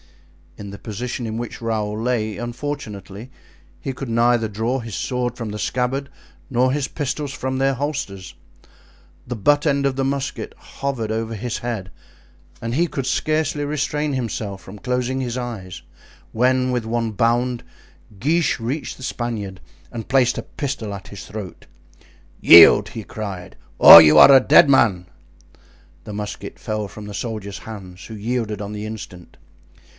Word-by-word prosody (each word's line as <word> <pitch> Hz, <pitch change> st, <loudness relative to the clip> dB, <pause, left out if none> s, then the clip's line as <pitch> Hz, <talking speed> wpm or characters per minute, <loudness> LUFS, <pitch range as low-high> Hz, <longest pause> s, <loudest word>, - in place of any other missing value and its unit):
In 100 Hz, -2 st, -8 dB
the 100 Hz, -, -10 dB
position 120 Hz, +3 st, -5 dB
in 110 Hz, 0 st, -4 dB
which 120 Hz, 0 st, -6 dB
Raoul 110 Hz, -2 st, -2 dB
lay, 110 Hz, -3 st, -1 dB
unfortunately, 120 Hz, -4 st, -6 dB, 0.5 s
he 135 Hz, -, -4 dB
could 130 Hz, -1 st, -7 dB
neither 115 Hz, 0 st, +2 dB
draw 110 Hz, +5 st, -2 dB
his 115 Hz, -4 st, -7 dB
sword 125 Hz, +4 st, -2 dB
from 115 Hz, -3 st, -5 dB
the 105 Hz, -, -6 dB
scabbard, 130 Hz, +4 st, -2 dB, 0.4 s
nor 130 Hz, 0 st, +2 dB
his 140 Hz, -1 st, -1 dB
pistols 145 Hz, -1 st, -4 dB
from 130 Hz, 0 st, -3 dB
their 135 Hz, 0 st, +1 dB
holsters. 135 Hz, -9 st, -4 dB, 0.9 s
The 125 Hz, -, -4 dB
butt 145 Hz, +8 st, +2 dB
end 140 Hz, -2 st, +1 dB
of 135 Hz, -1 st, 0 dB
the 135 Hz, -, -1 dB
musket 135 Hz, 0 st, -3 dB
hovered 130 Hz, -6 st, -4 dB
over 110 Hz, 0 st, -3 dB
his 115 Hz, +2 st, -4 dB
head, 110 Hz, -6 st, -5 dB, 0.7 s
and 115 Hz, +1 st, -3 dB
he 170 Hz, +6 st, +2 dB
could 135 Hz, -4 st, -4 dB
scarcely 155 Hz, +3 st, 0 dB
restrain 150 Hz, 0 st, -1 dB
himself 110 Hz, -6 st, -4 dB
from 100 Hz, +2 st, -11 dB
closing 125 Hz, +3 st, -2 dB
his 125 Hz, -1 st, -3 dB
eyes, 110 Hz, -7 st, -6 dB, 0.5 s
when 130 Hz, +2 st, +2 dB
with 125 Hz, -2 st, -1 dB
one 115 Hz, 0 st, -2 dB
bound 120 Hz, +3 st, 0 dB, 0.6 s
Guiche 155 Hz, -, +1 dB
reached 125 Hz, +7 st, -4 dB
the 130 Hz, -, -11 dB
Spaniard 110 Hz, -7 st, -4 dB, 0.3 s
and 115 Hz, -2 st, -7 dB
placed 130 Hz, -2 st, +3 dB
a -, -, -4 dB
pistol 130 Hz, -8 st, -5 dB
at 100 Hz, -, -9 dB
his 100 Hz, -3 st, -9 dB
throat. 100 Hz, -4 st, -8 dB, 0.7 s
"Yield!" 100 Hz, +5 st, +8 dB
he 110 Hz, 0 st, -7 dB
cried, 100 Hz, -4 st, -7 dB, 0.2 s
"or 85 Hz, -, +12 dB
you 75 Hz, -1 st, +6 dB
are 140 Hz, -, +10 dB
a 135 Hz, -, +9 dB
dead 145 Hz, +4 st, +6 dB
man!" 100 Hz, -10 st, +3 dB, 1.0 s
The 105 Hz, -, -8 dB
musket 105 Hz, 0 st, -6 dB
fell 110 Hz, -1 st, -3 dB
from 105 Hz, +2 st, -10 dB
the 105 Hz, -, -8 dB
soldier's 100 Hz, -2 st, -5 dB
hands, 95 Hz, -5 st, -10 dB
who 110 Hz, -, -8 dB
yielded 110 Hz, -1 st, -3 dB
on 100 Hz, +1 st, -6 dB
the 105 Hz, 0 st, -5 dB
instant. 100 Hz, -5 st, -10 dB
120 Hz, 160 wpm, -21 LUFS, 105-130 Hz, 1.0 s, or